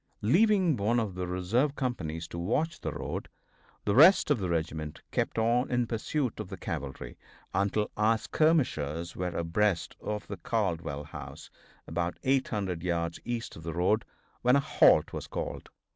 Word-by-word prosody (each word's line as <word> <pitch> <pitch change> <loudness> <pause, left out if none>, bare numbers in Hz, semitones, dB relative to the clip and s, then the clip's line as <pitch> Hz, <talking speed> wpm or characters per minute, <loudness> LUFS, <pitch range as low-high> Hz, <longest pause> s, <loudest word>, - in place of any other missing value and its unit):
Leaving 185 - +4
one 115 +3 +1
of 110 -4 -2
the 90 0 -3
reserve 105 +11 0
companies 85 - -3
to 85 - -6
watch 150 - -1
the - - -2
road, - - -5 0.6
the 100 - +2
rest 160 - +7
of 140 - +3
the 95 -2 -2
regiment 80 -2 -2
kept - - -1
on 120 +3 +2
in 125 -1 +1
pursuit 120 +3 -2
of - - -4
the - - -6
cavalry 70 -1 -6 0.3
until 100 +2 0
our 110 +2 +3
skirmishers 85 - +1
were 90 - -2
abreast 85 +2 0
of 105 0 -3
the - - -6
Caldwell 85 -9 -2
house, 75 - -9 0.3
about 85 0 -2
800 105 -10 0
yards 85 -1 -1
east 120 -1 -4
of - - -10
the 80 0 -5
road, 90 +6 +2 0.4
when 125 +2 +5
a - - +5
halt 140 - +4
was - - -5
called. - - -5
105 Hz, 160 wpm, -29 LUFS, 85-125 Hz, 0.6 s, rest